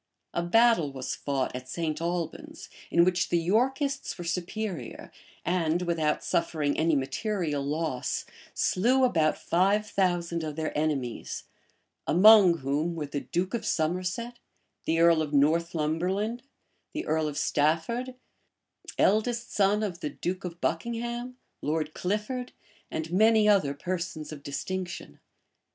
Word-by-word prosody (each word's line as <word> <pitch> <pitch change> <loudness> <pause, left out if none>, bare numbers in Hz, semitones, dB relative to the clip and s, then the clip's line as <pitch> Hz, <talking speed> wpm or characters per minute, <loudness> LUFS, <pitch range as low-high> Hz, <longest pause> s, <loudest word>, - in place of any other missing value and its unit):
A - - 0
battle 200 -4 +4
was 130 -2 -4
fought 135 -3 -2
at 125 0 -7
St. 160 -1 -2
Albans, 170 -1 -4 0.2
in 170 - +5
which 180 -1 +1
the 175 - +2
Yorkists 265 - 0
were 175 - -6
superior, 180 +3 -4 0.3
and, 175 0 +1
without 160 -3 0
suffering 155 -4 0
any 160 0 +2
material 145 +2 -1
loss, 150 -2 -2 0.3
slew 250 +8 +2
about 160 -11 +3
five 195 +5 +2
thousand 175 -4 0
of 155 -2 -4
their 160 0 -3
enemies; 145 -6 -2 0.6
among 190 -1 +7
whom 150 +5 0
were 155 -2 -3
the 145 0 -3
duke 180 +6 -2
of 235 - -2
Somerset, 185 +9 -1 0.5
the 165 +1 +1
earl 170 -1 +5
of 150 -1 -3
Northumberland, 170 - +1 0.5
the 315 - -3
earl 155 0 +1
of 145 -1 -5
Stafford, 170 - 0 0.8
eldest 230 +3 +2
son 205 +1 +3
of 180 -5 -3
the 150 -4 -3
duke 180 +6 -4
of 175 -1 -6
Buckingham, 235 +7 -3 0.2
Lord 155 0 -1
Clifford, 215 +7 -3 0.4
and 160 +1 -4
many 220 +2 +5
other 185 -10 +3
persons 170 -1 -4
of 150 -2 -8
distinction. 180 +6 -5
170 Hz, 130 wpm, -28 LUFS, 155-210 Hz, 0.8 s, among